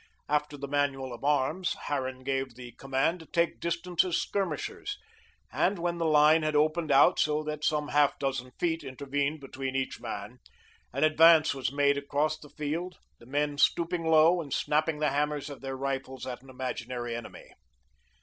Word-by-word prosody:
After 150 0 0
the 140 0 -5
manual 135 -2 -1
of 120 - -10
arms, 150 +5 +1
Harran 130 -2 -3
gave 135 -2 -2
the 125 -1 -10
command 135 +8 -1
to 160 - -13
take 170 0 0
distance 170 +1 0
as 180 -3 0
skirmishers, 205 - -3 0.5
and 200 - +1
when 170 0 -2
the 165 - +1
line 155 +1 +5
had 155 -1 -1
opened 155 +1 +2
out 140 +1 +6
so 150 0 +1
that 150 0 -5
some 150 -1 0
half 145 -1 +3
dozen 135 -2 -2
feet 165 -2 0
intervened 140 +2 -2
between 135 -1 -5
each 135 0 -2
man, - - -6 0.5
an - - -1
advance 160 0 +6
was 135 -3 -2
made 140 0 +2
across 145 +2 0
the 150 - -13
field, 165 +5 -4 0.2
the 120 - -16
men 145 +1 -1
stooping 170 +2 +2
low 160 +2 +5
and 145 -4 -6
snapping 155 +1 +1
the 150 -1 +1
hammers 150 0 -1
of 140 - -10
their 135 -1 -5
rifles 135 -1 -4
at 125 -1 -6
an 135 - -17
imaginary 125 -2 -4
enemy. 120 - -9
145 Hz, 175 wpm, -29 LUFS, 135-160 Hz, 0.5 s, out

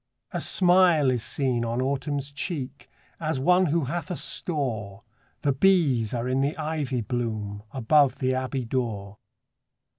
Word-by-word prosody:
A 175 - -2
smile 175 -7 +4
is 125 -2 -1
seen 125 -1 0
on 115 +1 -2
Autumn's 140 +1 -2
cheek, 140 -3 -5 0.3
As 155 -4 -1
one 180 +6 +4
who 160 +1 +1
hath 170 +7 -4
a 180 - -3
store; 115 - -3 0.4
The 140 -2 +2
bees 140 - +3
are 120 0 -2
in 130 +1 +1
the 140 +3 -1
ivy 150 -5 -2
bloom, 110 -4 -3
Above 140 +2 +3
the 130 -1 0
abbey 130 0 -2
door. 110 -5 -3
135 Hz, 145 wpm, -26 LUFS, 120-155 Hz, 0.4 s, smile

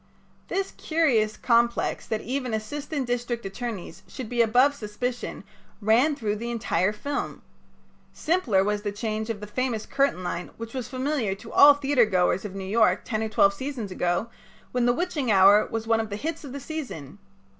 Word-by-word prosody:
'" - - -35
This 390 0 -1
curious 255 -10 +1
complex 235 0 +1
that 220 -1 -2
even 255 -2 -2
assistant 280 +5 -4
district 240 -1 -2
attorneys 195 -4 -6
should 250 -4 -7
be 240 -1 +2
above 250 +5 +4
suspicion 240 0 -4 0.4
ran 235 +8 +3
through 215 -6 -2
the 235 +2 -5
entire 215 -4 0
film. 280 +7 -4 0.7
Simpler 285 - +1
was 210 +1 -1
the 205 -1 -3
change 215 +1 -3
of 215 -3 -4
the - - -5
famous 230 +1 -2
curtain 275 -9 0
line 175 0 -4
which 230 0 -7
was 255 -3 -4
familiar 255 -5 -1
to 225 +3 -12
all 285 0 +8
theatergoers 220 -10 +2
of 195 -2 -6
New 195 -1 -5
York 220 +3 +3
ten 215 -3 -2
or 220 - -2
twelve 200 -2 +4
seasons 240 -2 -5
ago 175 +3 0 0.4
when 245 -1 +1
"The 240 - +4
Witching 295 -6 -1
Hour" 200 +2 +6
was 225 0 -4
one 225 0 +2
of 220 -1 -2
the 205 - -4
hits 315 +9 -4
of 280 - -8
the 280 - -5
season. 245 - -7
230 Hz, 180 wpm, -26 LUFS, 210-265 Hz, 0.7 s, all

